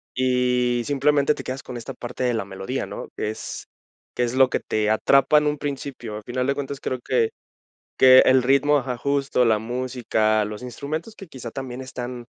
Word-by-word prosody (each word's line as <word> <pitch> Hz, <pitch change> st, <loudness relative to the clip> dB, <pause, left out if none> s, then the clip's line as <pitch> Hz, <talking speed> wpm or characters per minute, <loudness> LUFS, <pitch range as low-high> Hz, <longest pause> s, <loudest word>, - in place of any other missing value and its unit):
y 125 Hz, -1 st, +1 dB
simplemente 145 Hz, +1 st, +2 dB
te -, -, -7 dB
quedas 130 Hz, +1 st, -5 dB
con 125 Hz, -, -8 dB
esta 115 Hz, -, -7 dB
parte 125 Hz, +1 st, -6 dB
de 125 Hz, -1 st, +2 dB
la 110 Hz, -4 st, -2 dB
melodía, 95 Hz, +7 st, -4 dB
¿no? -, -, -7 dB
Es, 110 Hz, +1 st, -5 dB, 0.5 s
que 125 Hz, -, +1 dB
es 120 Hz, +1 st, -1 dB
lo 130 Hz, 0 st, +5 dB
que -, -, 0 dB
te 105 Hz, 0 st, -1 dB
atrapa 135 Hz, +7 st, +4 dB
en 150 Hz, -, +3 dB
un 150 Hz, 0 st, 0 dB
principio, 135 Hz, -6 st, -5 dB
al 105 Hz, -, -7 dB
final 125 Hz, +1 st, -2 dB
de 140 Hz, -, +1 dB
cuentas, 140 Hz, -1 st, -5 dB
creo 130 Hz, -, -3 dB
que 120 Hz, -2 st, +1 dB, 0.7 s
que 130 Hz, 0 st, +8 dB
el 130 Hz, -1 st, +5 dB
ritmo 145 Hz, +2 st, +4 dB
ajá, 125 Hz, -2 st, -3 dB
justo, 140 Hz, -1 st, +1 dB
la 110 Hz, -2 st, +3 dB
música, 115 Hz, -2 st, 0 dB
los 105 Hz, +3 st, -7 dB
instrumentos 155 Hz, -, -5 dB
que 195 Hz, -, -10 dB
quizá 125 Hz, -5 st, -8 dB
también 130 Hz, -1 st, -6 dB
están 125 Hz, -2 st, -7 dB
125 Hz, 195 wpm, -23 LUFS, 120-140 Hz, 0.7 s, que